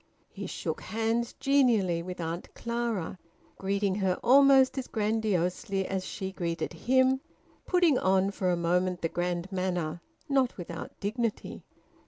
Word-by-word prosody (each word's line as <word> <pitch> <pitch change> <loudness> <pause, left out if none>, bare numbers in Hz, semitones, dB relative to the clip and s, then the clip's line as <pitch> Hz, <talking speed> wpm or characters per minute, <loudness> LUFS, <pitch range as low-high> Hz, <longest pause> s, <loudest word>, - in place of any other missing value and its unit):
He - - -6
shook - - -4
hands 225 +2 -1
genially 230 -11 +3
with 180 +1 -7
Auntie 165 +1 -4
Clara, 235 -7 -3 0.4
greeting 200 0 0
her 190 -2 0
almost 270 0 +6
as 260 - -5
grandiosely 205 -2 0
as 190 -1 -2
she 190 0 -4
greeted 170 -2 -3
him, 260 +8 +2 0.5
putting 350 -7 +4
on 190 +1 +2
for 190 -2 -1
a 180 - +3
moment 180 +1 0
the 165 - +1
grand 175 +2 -2
manner, 175 -3 -2 0.3
not 270 -4 +1
without 170 -2 -7
dignity. 220 +2 -3
195 Hz, 135 wpm, -29 LUFS, 180-235 Hz, 0.5 s, almost